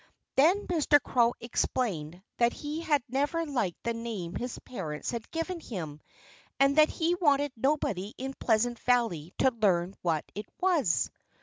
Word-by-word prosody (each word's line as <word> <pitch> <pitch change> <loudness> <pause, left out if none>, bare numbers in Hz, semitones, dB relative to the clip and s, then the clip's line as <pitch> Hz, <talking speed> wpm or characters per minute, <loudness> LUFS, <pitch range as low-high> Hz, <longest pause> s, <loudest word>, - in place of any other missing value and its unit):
Then 350 +9 +4
Mr. 310 -4 +4
Crow 240 -2 +2
explained 185 -8 -2
that 235 0 +3
he 300 +2 -5
had 295 -5 +2
never 290 +6 0
liked 240 - -2
the 235 - 0
name 225 -7 -5
his 245 0 -4
parents 160 -11 -5
had 235 -2 -5
given 335 +2 -3
him 160 - -6 0.6
and 275 +1 +4
that 310 0 +7
he 335 +1 0
wanted 290 -5 +2
nobody 220 -7 -1
in 265 +1 -4
Pleasant 235 +1 +1
Valley 225 -11 +1
to 265 - +4
learn 190 -6 +1
what 165 -3 0
it 210 +1 -6
was. 320 - +2
240 Hz, 150 wpm, -29 LUFS, 195-290 Hz, 0.6 s, that